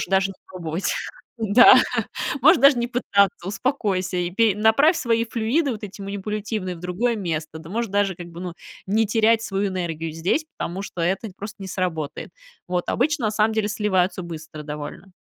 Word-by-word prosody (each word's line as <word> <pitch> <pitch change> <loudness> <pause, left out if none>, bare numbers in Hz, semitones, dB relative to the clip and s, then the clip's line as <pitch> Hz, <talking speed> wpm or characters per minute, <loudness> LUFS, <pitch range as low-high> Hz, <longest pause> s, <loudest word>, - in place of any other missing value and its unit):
Можешь - - -2
даже 195 +1 +2
не - - -10
пробовать. 170 0 -3 0.5
Да. 225 +4 +7 0.7
Можешь 265 -1 +6
даже 275 -1 +7
не 240 - 0
пытаться. 200 -7 +1
Успокойся. 195 -4 -1
И 175 0 -1
пе 215 +1 +3
направь 220 - +4
свои 230 -2 +1
флюиды 240 +7 0
вот 220 -2 -6
эти 200 0 -8
манипулятивные 200 -1 -4
в - - -12
другое 180 +8 -1
место. 160 -5 -4
Ты 160 +1 -11
можешь 225 +1 -2
даже, 200 -2 +1
как 175 0 -9
бы, 170 0 -10
ну 180 -2 -5 0.3
не 220 +3 +2
терять 225 +1 +3
свою 200 -1 -1
энергию 165 -3 -3
здесь, 180 - 0
потому 180 +3 -4
что 180 - -6
это 190 +6 -1
просто 210 +2 -7
не - - -6
сработает". 160 -6 -3 0.4
Вот. 180 -1 -2
Обычно 275 -1 +1
на - - -1
самом 215 +1 +2
деле 220 -1 0
сливаются 190 -4 0
быстро 155 -2 -8
довольно. 150 +5 -7
200 Hz, 180 wpm, -23 LUFS, 180-225 Hz, 0.7 s, Да